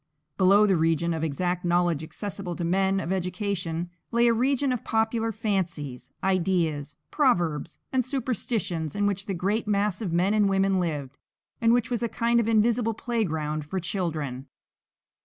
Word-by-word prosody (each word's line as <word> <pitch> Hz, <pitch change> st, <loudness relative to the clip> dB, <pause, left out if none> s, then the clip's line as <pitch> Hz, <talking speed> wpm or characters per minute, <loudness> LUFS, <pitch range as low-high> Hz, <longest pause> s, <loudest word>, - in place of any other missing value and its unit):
Below 195 Hz, +3 st, +5 dB
the 195 Hz, -2 st, +3 dB
region 165 Hz, +1 st, +1 dB
of 160 Hz, -1 st, -3 dB
exact 175 Hz, +4 st, -1 dB
knowledge 175 Hz, -3 st, +1 dB
accessible 190 Hz, +1 st, -5 dB
to 175 Hz, -, -4 dB
men 190 Hz, +3 st, +2 dB
of 170 Hz, 0 st, -3 dB
education, 180 Hz, -2 st, -2 dB, 0.2 s
lay 235 Hz, 0 st, +3 dB
a 235 Hz, -, +5 dB
region 265 Hz, +3 st, +1 dB
of 250 Hz, -, -2 dB
popular 225 Hz, 0 st, 0 dB
fancies, 180 Hz, -, -3 dB
ideas, 170 Hz, -6 st, 0 dB
proverbs, 170 Hz, -, +1 dB, 0.2 s
and 260 Hz, -1 st, +3 dB
superstitions 230 Hz, -, -2 dB
in 205 Hz, 0 st, +1 dB
which 200 Hz, 0 st, -1 dB
the 195 Hz, -, -2 dB
great 205 Hz, +6 st, -1 dB
mass 205 Hz, -1 st, +1 dB
of 195 Hz, -6 st, -2 dB
men 180 Hz, +4 st, +2 dB
and 210 Hz, -2 st, +3 dB
women 195 Hz, 0 st, +2 dB
lived, 145 Hz, -6 st, -3 dB, 0.4 s
and 230 Hz, 0 st, +4 dB
which 240 Hz, 0 st, +2 dB
was 240 Hz, -, 0 dB
a 235 Hz, -, 0 dB
kind 235 Hz, +1 st, +2 dB
of 230 Hz, -, +1 dB
invisible 225 Hz, 0 st, +2 dB
playground 160 Hz, -11 st, -2 dB
for 170 Hz, +6 st, -3 dB
children. 155 Hz, -8 st, -3 dB
190 Hz, 160 wpm, -26 LUFS, 170-220 Hz, 0.4 s, Below